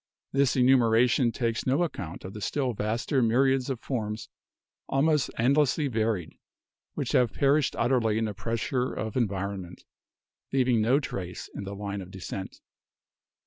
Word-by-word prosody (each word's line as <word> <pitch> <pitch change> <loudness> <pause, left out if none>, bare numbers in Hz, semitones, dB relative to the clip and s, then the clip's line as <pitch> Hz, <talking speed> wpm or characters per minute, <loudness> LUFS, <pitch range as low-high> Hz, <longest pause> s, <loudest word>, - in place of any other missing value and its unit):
This 135 -2 +2
enumeration 125 -1 +4
takes 115 +1 -2
no 140 +7 +3
ac 170 - -1
count 90 -2 -7
of 95 - -7
the 105 - -8
still 130 +4 -1
vaster 115 +6 0
myriads 130 +3 +2
of 130 -4 -2
forms 110 -5 -4 0.6
almost 150 +2 +2
endlessly 140 +4 +3
varied, 110 -7 -1 0.6
which - - -2
have 125 -3 +3
perished 140 0 +2
utterly 115 -4 +2
in 110 - +1
the 105 - -3
pressure 115 +4 -2
of 110 -1 -4
environment, 100 -5 -3 0.7
leaving 125 -4 +3
no 125 +6 +3
trace 90 -10 -6
in 100 - -6
the 100 +1 -6
line 100 0 -4
o - - -7
fdescent. 95 0 -7
115 Hz, 145 wpm, -27 LUFS, 105-130 Hz, 0.7 s, enumeration